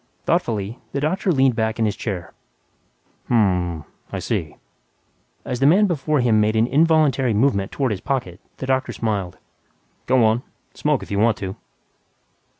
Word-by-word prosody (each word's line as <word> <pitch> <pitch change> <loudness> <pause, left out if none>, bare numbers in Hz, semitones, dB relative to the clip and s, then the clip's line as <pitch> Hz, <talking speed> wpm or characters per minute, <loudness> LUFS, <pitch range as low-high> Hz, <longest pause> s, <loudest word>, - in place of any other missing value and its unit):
Thoughtfully, 115 - -1
the 140 - -1
doctor 180 +6 0
leaned 135 -5 +3
back 110 -1 -1
in 115 - +1
his 105 -2 -1
chair, 95 -6 -5 0.9
"Hm 120 - +1
m 90 -5 +2
m... 80 -3 -7 0.3
I - - -3
see." - - -3 0.9
As 125 - -3
the 135 - +4
man 190 +7 +5
before 155 -5 0
him 110 -3 +3
made 110 +1 +1
an 110 +1 +4
involuntary 140 -4 +3
movement 105 -4 +1
toward 135 -4 -1
his 95 -2 -3
pocket, 95 -10 -3 0.2
the - - -5
doctor 130 0 0
smiled, 100 -6 -2 0.7
"Go 125 -2 +4
on, 110 +2 +2 0.3
smoke 150 -3 0
if - - -11
you 100 - 0
want 115 0 +3
to." 95 -1 -5
120 Hz, 165 wpm, -21 LUFS, 105-140 Hz, 0.9 s, man